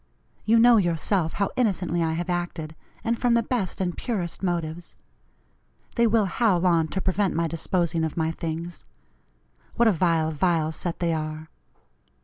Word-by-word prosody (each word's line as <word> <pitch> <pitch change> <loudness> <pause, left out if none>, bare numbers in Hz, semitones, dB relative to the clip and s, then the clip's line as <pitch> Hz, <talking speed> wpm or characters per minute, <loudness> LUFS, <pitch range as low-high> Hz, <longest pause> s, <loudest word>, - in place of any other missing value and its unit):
You 225 +2 +4
know 235 0 +7
yourself 175 -1 +1
how 200 - -1
innocently 185 -8 0
I 160 -1 0
have 170 +2 -3
acted, 175 -3 -3 0.3
and 230 0 -1
from 245 -1 +3
the 235 - +2
best 225 -6 -2
and 180 -2 -1
purest 190 -9 -3
motives. 170 -2 -3 1.0
They 235 -1 +3
will 220 -1 +3
howl 185 -2 +1
on 165 -3 +3
to 190 +5 -3
prevent 190 +1 0
my 165 0 +1
disposing 165 0 -1
of 160 0 -3
my 160 0 +1
things. 165 +1 -5 0.9
What 235 - +4
a - - +6
vile, 165 -3 +1
vile 160 0 +1
set 170 +2 -4
they 170 -1 +1
are! 155 0 -4
175 Hz, 160 wpm, -25 LUFS, 160-200 Hz, 1.0 s, know